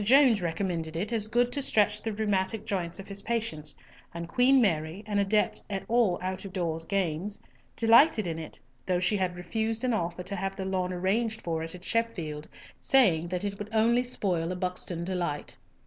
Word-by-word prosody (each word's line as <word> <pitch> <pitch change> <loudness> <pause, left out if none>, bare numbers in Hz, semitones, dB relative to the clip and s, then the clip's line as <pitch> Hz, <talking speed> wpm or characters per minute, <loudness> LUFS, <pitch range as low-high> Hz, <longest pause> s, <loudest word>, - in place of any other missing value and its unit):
Jones 250 -2 +5
recommended 165 -2 -2
it 205 +7 -2
as 215 -2 +2
good 240 +2 +2
to 285 - -1
stretch 210 -4 +2
the 225 - -2
rheumatic 205 0 -1
joints 180 -6 -2
of 195 - -9
his 200 0 -3
patients, 215 -10 -2 0.4
and 170 0 -5
Queen 255 +8 +4
Mary, 165 -3 0
an 205 -1 0
adept 205 +2 +1
at 195 -1 -3
all 225 -6 +3
out 185 0 -3
of 195 - -7
door 170 -3 -2
games, 195 +1 -1 0.4
delighted 230 - +5
in 165 -2 -3
it, 160 - -8 0.3
though 180 -1 +2
she 180 +4 +2
had 185 -2 -1
refused 220 +6 -2
an 250 -2 +1
offer 175 -3 -2
to 195 +2 -3
have 195 0 -3
the 190 - -4
lawn 185 -1 -1
arranged 215 +5 0
for 165 -2 -2
it 165 +2 -5
at 180 - -12
Sheffield, 170 -10 -2 0.3
saying 195 - +4
that 180 +1 -3
it 200 -1 -3
would 205 0 -6
only 230 +2 +3
spoil 180 -9 -1
a - - -2
Buxton 180 -1 -3
delight. 175 -5 -3
195 Hz, 195 wpm, -28 LUFS, 175-220 Hz, 0.4 s, Jones